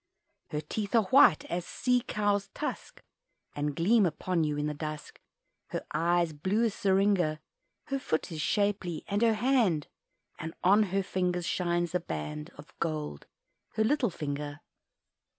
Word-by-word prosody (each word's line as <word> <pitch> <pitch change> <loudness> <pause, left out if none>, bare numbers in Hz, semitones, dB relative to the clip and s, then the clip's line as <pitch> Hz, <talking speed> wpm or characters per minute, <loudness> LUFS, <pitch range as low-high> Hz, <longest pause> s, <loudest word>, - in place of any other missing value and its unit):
Her 150 - -3
teeth 200 +8 -3
are 225 - +6
white 255 - +6
as 175 +1 -3
sea 250 +6 +1
cow's 205 -3 0
tusk, - - -5 0.5
And 145 0 -2
gleam 200 +5 +4
upon 170 +1 -1
you 150 -1 -1
in 150 - -1
the 150 - -1
dusk 155 0 -6 0.5
Her - - -4
eyes 170 -1 +2
blue 185 +10 0
as 225 -3 +1
seringa; 190 -5 +2 0.5
Her 275 0 -2
foot 160 -7 -2
is 155 -2 -4
shapely, 195 -5 0
and 205 +1 0
her 230 -2 +4
hand, 215 - +2 0.5
And 160 +1 -6
on 200 +4 +6
her 195 +1 0
finger 180 -1 -1
shines 175 -1 0
a 180 - +2
band 75 - -5
Of - - -13
gold 75 -2 -3 0.5
her 220 - +2
little 255 0 +2
finger! 145 -2 -5
180 Hz, 150 wpm, -30 LUFS, 155-205 Hz, 0.5 s, are